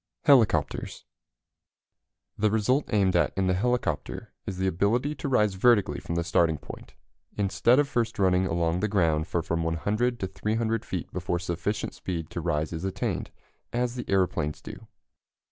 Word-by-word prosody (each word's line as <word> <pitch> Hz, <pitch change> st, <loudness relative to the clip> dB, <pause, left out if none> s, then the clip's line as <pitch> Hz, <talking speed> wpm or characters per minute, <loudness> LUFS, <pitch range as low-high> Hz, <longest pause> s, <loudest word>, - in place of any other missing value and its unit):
HELICOPTERS. 110 Hz, -, +2 dB, 1.3 s
The 105 Hz, +1 st, +2 dB
result 110 Hz, +7 st, +1 dB
aimed 95 Hz, -4 st, +2 dB
at 85 Hz, -, +3 dB
in 95 Hz, -, +2 dB
the 90 Hz, -, +2 dB
helicopter 100 Hz, -5 st, -2 dB
is 95 Hz, -, -4 dB
the 95 Hz, -, -1 dB
ability 105 Hz, -, +1 dB
to 140 Hz, -1 st, -5 dB
rise 105 Hz, -6 st, +3 dB
vertically 105 Hz, +1 st, +3 dB
from 85 Hz, -, -5 dB
the 85 Hz, -, 0 dB
starting 85 Hz, -2 st, +2 dB
point, -, -, -11 dB, 0.4 s
instead 105 Hz, +5 st, +3 dB
of 145 Hz, -1 st, +3 dB
first 120 Hz, -4 st, -1 dB
running 95 Hz, -1 st, +3 dB
along 85 Hz, 0 st, 0 dB
the 105 Hz, -, 0 dB
ground 80 Hz, -6 st, +1 dB
for 85 Hz, -3 st, -1 dB
from 85 Hz, +1 st, -1 dB
100 105 Hz, +9 st, 0 dB
to 95 Hz, -, -1 dB
300 110 Hz, +4 st, -1 dB
feet -, -, -5 dB
before 90 Hz, 0 st, -1 dB
sufficient 90 Hz, +4 st, -3 dB
speed 85 Hz, -4 st, -5 dB
to 85 Hz, -, -4 dB
rise 80 Hz, -1 st, -1 dB
is 80 Hz, +1 st, -5 dB
attained, 95 Hz, -1 st, -2 dB, 0.4 s
as 120 Hz, 0 st, -1 dB
the 125 Hz, -1 st, -5 dB
aeroplanes 90 Hz, -6 st, 0 dB
do. -, -, -10 dB
95 Hz, 160 wpm, -27 LUFS, 85-115 Hz, 1.3 s, at